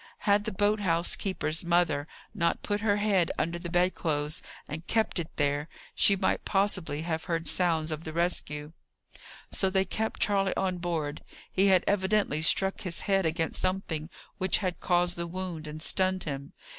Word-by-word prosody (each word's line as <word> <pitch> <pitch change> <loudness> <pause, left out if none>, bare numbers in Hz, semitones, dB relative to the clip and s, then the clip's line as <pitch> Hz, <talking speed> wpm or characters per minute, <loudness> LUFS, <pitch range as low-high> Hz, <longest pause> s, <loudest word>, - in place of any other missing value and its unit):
Had 205 0 +3
the - - -1
boat 205 +2 +2
house 170 -3 +1
keeper's 180 -4 -1
mother 170 -4 +2 0.3
not 170 -5 0
put 205 0 -1
her 205 -2 +2
head 200 -5 +2
under 170 +1 -1
the 170 0 -6
bed 180 +1 +2
clothes 150 -2 -1 0.3
and 160 +3 -6
kept 220 -4 +1
it 165 - -4
there, 145 +1 0 0.2
she 200 - +5
might 190 0 0
possibly 190 -6 0
have 160 -1 -2
heard 165 -2 -1
sounds 160 -1 +1
of 155 +1 -4
the 160 - -5
rescue. 155 -3 -2 0.8
So 190 - +2
they 190 0 +2
kept 220 +4 -2
Charley 195 -2 +2
on 185 -2 -1
board. 160 -4 -2 0.3
He 195 +1 +3
had 185 -2 +5
evidently 195 -5 +1
struck 190 +4 +2
his 175 -3 -4
head 195 -3 +2
against 160 0 -1
something 180 -4 -2 0.3
which 185 -1 +3
had 185 -4 -2
caused 175 0 +1
the 170 0 -3
wound, 170 -3 -5
and 155 +1 -7
stunned 185 +1 +1
him. 140 -2 -5
175 Hz, 175 wpm, -29 LUFS, 160-190 Hz, 0.8 s, she